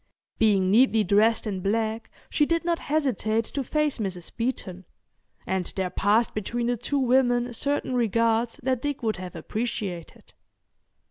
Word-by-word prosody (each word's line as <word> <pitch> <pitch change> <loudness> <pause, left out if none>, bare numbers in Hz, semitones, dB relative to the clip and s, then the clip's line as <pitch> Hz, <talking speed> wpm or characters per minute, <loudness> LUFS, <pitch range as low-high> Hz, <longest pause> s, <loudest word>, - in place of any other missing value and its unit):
Being 195 -4 +3
neatly 225 -1 +5
dressed 215 +5 +3
in 200 -3 -3
black 220 +3 -1 0.2
she 300 - +1
did 335 0 0
not 340 -1 +1
hesitate 230 -7 0
to 275 - -3
face 300 0 0
Mrs. 185 -5 -4
Beeton, 195 -7 -3 0.6
and 190 -2 -2
there 185 -2 -1
passed 210 +5 +2
between 235 +3 -2
the 245 +1 +1
two 245 +5 -2
women 245 -2 +2
certain 280 +2 -1
regards 230 +1 +1
that 255 -1 0
Dick 290 -3 -3
would 220 -2 0
have 180 -1 -8
appreciated. 195 -1 -5
230 Hz, 145 wpm, -26 LUFS, 200-255 Hz, 0.6 s, neatly